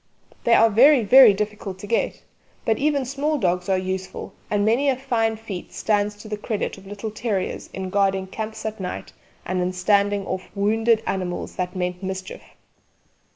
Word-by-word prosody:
They 235 - +6
are 225 0 +5
very 255 +4 +6
very 250 +2 +8
difficult 205 -1 -4
to 190 - -9
get; 230 +3 -1 0.4
but 220 -1 +1
even 285 -2 +1
small 285 +4 -1
dogs 180 -5 0
are 190 - +3
useful, 185 0 -4 0.2
and 205 -1 +1
many 245 +6 +3
a 265 - +2
fine 235 -4 0
feat 215 -5 -7
stands 210 -1 0
to 210 +1 -12
the 210 -1 -4
credit 210 0 -3
of 195 - -15
little 205 +2 -6
terriers 210 -3 -3
in 190 -1 -5
guarding 195 -1 +1
camps 220 +3 -6
at 220 0 -4
night 180 -1 -6 0.3
and 185 0 -1
in 180 0 0
standing 200 +2 +2
off 185 0 -5
wounded 220 +3 +2
animals 180 -2 -3
that 180 0 -3
meant 180 0 -2
mischief. 190 -1 -5
205 Hz, 175 wpm, -23 LUFS, 190-225 Hz, 0.4 s, very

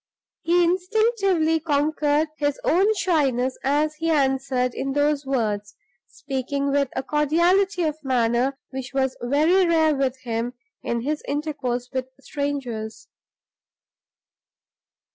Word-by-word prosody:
He 350 +1 +3
instinctively 370 -2 +2
conquered 300 0 +1
his 290 -1 0
own 385 +6 +3
shyness 265 - +1
as 295 +3 +1
he 330 +1 -1
answered 265 -4 +1
in 270 0 -3
those 290 -1 +1
words, 210 -6 -1 0.3
speaking 280 0 -3
with 280 -1 +1
a 265 - -2
cordiality 345 +7 +2
of 310 -1 -2
manner 250 +1 +1
which 265 0 -7
was 265 -1 +1
very 305 +10 +3
rare 320 -2 +3
with 265 -2 -1
him 235 0 -3 0.3
in 235 0 -2
his 300 +4 -2
intercourse 280 -5 -3
with 260 -1 -2
strangers. 275 - -4
285 Hz, 115 wpm, -23 LUFS, 260-315 Hz, 0.3 s, He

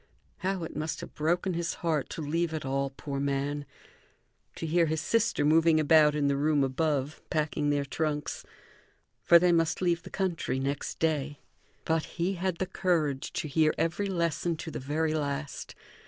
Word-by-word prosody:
How 190 -2 -2
it 165 - -6
must 155 +1 -3
have - - -9
broken 175 +4 0
his 170 0 -2
heart 155 -4 0
to 160 - -5
leave 160 +2 -1
it 155 - -4
all, 135 +1 0
poor 140 0 -5
man; 140 +1 -1 0.9
to - - -5
hear 165 +1 +3
his 160 0 0
sister 230 -8 +1
moving 160 +1 +5
about 155 -1 +5
in 145 -1 +1
the 140 - +2
room 145 0 +2
above, 140 +1 -1
packing 150 -1 0
their 145 -1 +1
trunks! 150 +1 -2 0.8
For 170 - +7
they 180 +1 +4
must 165 -2 +2
leave 175 -2 +1
the - - -11
country 175 -9 -1
next 140 +1 -3
day. 150 -3 0 0.5
But 160 -1 +1
he 180 +3 +1
had 185 -1 -1
the 190 - -1
courage 170 -7 0
to - - -2
hear 155 +1 +2
every 170 +5 0
lesson 170 -2 0
to 160 - -6
the - - -5
very 155 +4 -1
last. 145 -1 -3
155 Hz, 175 wpm, -29 LUFS, 145-170 Hz, 0.9 s, For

